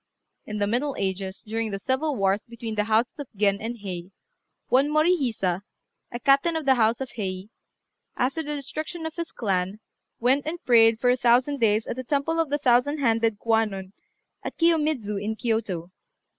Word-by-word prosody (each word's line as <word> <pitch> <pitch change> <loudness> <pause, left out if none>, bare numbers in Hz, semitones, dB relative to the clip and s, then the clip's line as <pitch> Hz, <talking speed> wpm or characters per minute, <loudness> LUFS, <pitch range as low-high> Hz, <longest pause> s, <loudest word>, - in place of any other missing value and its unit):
In 210 - -4
the 205 - +1
middle 250 +7 -1
ages, 190 0 -3
during 225 +1 -2
the 200 - -3
civil 270 +7 -1
wars 195 -1 +1
between 230 -1 -6
the 210 -1 0
houses 225 +5 +1
of 285 - -5
Gen 200 0 +2
and 235 +2 -4
Hei, 180 -2 -5 0.6
one 270 +3 +3
Morihisa, 275 - +1 0.5
a 240 - -5
captain 280 +6 +3
of 320 -2 -2
the 270 - +6
house 230 -1 +2
of 265 - -4
Hei, 190 -1 -4 0.7
after 270 +6 0
the 295 -1 -3
destruction 310 +4 -5
of 320 - -4
his 335 0 -5
clan, 195 -2 -1 0.4
went 265 +5 +2
and 330 +3 -2
prayed 225 -2 +5
for 245 +1 +3
a 250 - +2
thousand 250 +4 +3
days 220 -1 +2
at - - -5
the 255 - -4
temple 290 +5 0
of 325 -3 +1
the 290 - +1
thousand 260 +2 +3
handed 225 -5 +2
Kwannon 210 -4 0 0.5
at - - -6
Kiyomidzu, 300 -12 +1
in 220 +1 -2
Kiyôto. 215 -7 -2
235 Hz, 180 wpm, -25 LUFS, 210-280 Hz, 0.7 s, the